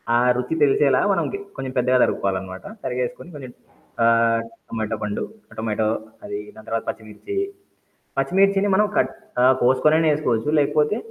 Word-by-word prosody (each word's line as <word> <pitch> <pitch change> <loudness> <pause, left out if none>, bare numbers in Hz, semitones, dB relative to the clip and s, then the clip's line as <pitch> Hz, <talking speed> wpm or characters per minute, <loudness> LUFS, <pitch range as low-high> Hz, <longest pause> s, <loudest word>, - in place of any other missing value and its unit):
ఆ - - +5 0.2
రుచి 125 +5 -2
తెలిసేలా 135 -1 +4
మనం 195 - +1
కీ - - -3 0.2
కొంచెం 130 -1 -5
పెద్దగా 125 +1 +3
తరుక్కోవాలన్నమాట. 95 -1 -2 0.2
తరిగేసుకొని 125 +6 -3
కొంచెం 130 -3 -8 0.5
ఆహ్, 115 0 +4 0.3
టమాటో 110 -1 -3
పండు 105 -1 -2 0.4
టొమాటో 110 -1 0 0.4
అది - - -5 0.2
దాని 110 0 -14
తర్వాత 115 0 -1
పచ్చిమిర్చి, 110 - -7 0.8
పచ్చిమిర్చిని 195 +7 +3
మనం 210 +2 +4
కట్ 130 +1 +2 0.3
ఆహ్, 130 +1 +6
కోసుకొనైనా 155 +5 +4
ఏసుకోవచ్చు. 125 -3 0
లేకపోతే 150 +6 +2
125 Hz, 135 wpm, -22 LUFS, 115-150 Hz, 0.8 s, ఆహ్